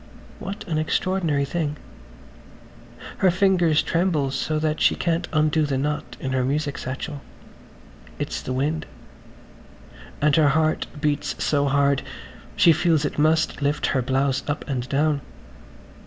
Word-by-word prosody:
What 200 Hz, +2 st, -6 dB
an 160 Hz, -3 st, 0 dB
extraordinary 155 Hz, -3 st, 0 dB
thing. 150 Hz, -1 st, -2 dB, 1.4 s
Her 190 Hz, -, +5 dB
fingers 180 Hz, -4 st, +3 dB
tremble 165 Hz, -6 st, 0 dB
so 155 Hz, +3 st, -1 dB
that 155 Hz, 0 st, -1 dB
she -, -, +4 dB
can't 170 Hz, 0 st, -1 dB
undo 155 Hz, 0 st, +2 dB
the 135 Hz, -2 st, -1 dB
knot 150 Hz, +2 st, -3 dB
in 130 Hz, -, -3 dB
the 130 Hz, -1 st, +1 dB
music 145 Hz, +2 st, -1 dB
satchel. 135 Hz, +3 st, -5 dB, 1.0 s
It's -, -, -3 dB
the -, -, -5 dB
wind.... 150 Hz, +4 st, -1 dB, 1.3 s
And 150 Hz, 0 st, +3 dB
her 155 Hz, -2 st, +5 dB
heart 155 Hz, +2 st, +1 dB
beats 150 Hz, -1 st, -1 dB
so 145 Hz, -1 st, +2 dB
hard 140 Hz, 0 st, +2 dB, 0.5 s
she 165 Hz, -, +6 dB
feels 160 Hz, -2 st, +2 dB
it -, -, -3 dB
must 155 Hz, +1 st, +2 dB
lift 145 Hz, +1 st, 0 dB
her 130 Hz, -, +2 dB
blouse 135 Hz, +2 st, 0 dB
up 145 Hz, 0 st, -3 dB
and 130 Hz, -2 st, -3 dB
down. 145 Hz, +1 st, +1 dB
150 Hz, 140 wpm, -23 LUFS, 140-160 Hz, 1.4 s, she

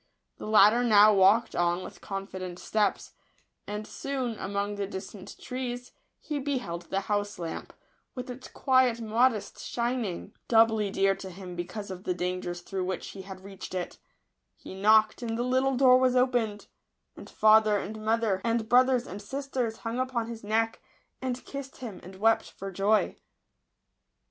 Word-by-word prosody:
The -, -, -7 dB
latter 215 Hz, +3 st, +6 dB
now 215 Hz, -2 st, +7 dB
walked 205 Hz, +4 st, +4 dB
on 175 Hz, +1 st, +1 dB
with -, -, -10 dB
confident 190 Hz, -2 st, -6 dB
steps; 210 Hz, +1 st, -1 dB, 0.5 s
and 210 Hz, +1 st, -4 dB
soon, 260 Hz, -3 st, -3 dB
among 200 Hz, +1 st, -2 dB
the 200 Hz, -1 st, -3 dB
distant 190 Hz, 0 st, -8 dB
trees, 250 Hz, -1 st, -5 dB, 0.3 s
he 295 Hz, -2 st, -4 dB
beheld 250 Hz, -12 st, -3 dB
the 195 Hz, -, 0 dB
house 205 Hz, 0 st, -2 dB
lamp, 165 Hz, -2 st, -6 dB, 0.4 s
with 250 Hz, -, -5 dB
its 255 Hz, 0 st, -8 dB
quiet 255 Hz, -3 st, +2 dB
modest 225 Hz, 0 st, +1 dB
shining, 235 Hz, -6 st, -3 dB
doubly 225 Hz, -2 st, +4 dB
dear 195 Hz, 0 st, +2 dB
to 190 Hz, -, -8 dB
him 180 Hz, -1 st, -9 dB
because 195 Hz, +4 st, -5 dB
of 185 Hz, 0 st, -8 dB
the 180 Hz, -, -1 dB
dangers 180 Hz, 0 st, -3 dB
through 190 Hz, +1 st, -4 dB
which 185 Hz, 0 st, -4 dB
he 195 Hz, -, -8 dB
had 190 Hz, 0 st, -10 dB
reached 195 Hz, -1 st, -8 dB
it 180 Hz, -1 st, -4 dB, 0.6 s
He -, -, -11 dB
knocked, 215 Hz, +3 st, +4 dB
and 225 Hz, -1 st, -3 dB
the 240 Hz, -, 0 dB
little 260 Hz, +1 st, +1 dB
door 255 Hz, -1 st, +6 dB
was 255 Hz, -1 st, +3 dB
opened; 245 Hz, -5 st, +1 dB, 0.5 s
and -, -, -11 dB
father 215 Hz, -1 st, +5 dB
and 215 Hz, +2 st, -6 dB
mother, 220 Hz, -3 st, +1 dB
and 230 Hz, -1 st, 0 dB
brothers 255 Hz, 0 st, +4 dB
and 200 Hz, +3 st, -8 dB
sisters, 255 Hz, -1 st, -3 dB
hung 230 Hz, +2 st, -2 dB
upon 255 Hz, -3 st, -1 dB
his 230 Hz, -1 st, -8 dB
neck, 225 Hz, +2 st, 0 dB, 0.4 s
and 255 Hz, -1 st, -3 dB
kissed 275 Hz, -1 st, -7 dB
him, 225 Hz, -7 st, -7 dB
and 185 Hz, +2 st, -11 dB
wept 225 Hz, +3 st, +2 dB
for 195 Hz, 0 st, -8 dB
joy. 200 Hz, +2 st, +1 dB
215 Hz, 160 wpm, -28 LUFS, 195-245 Hz, 0.6 s, now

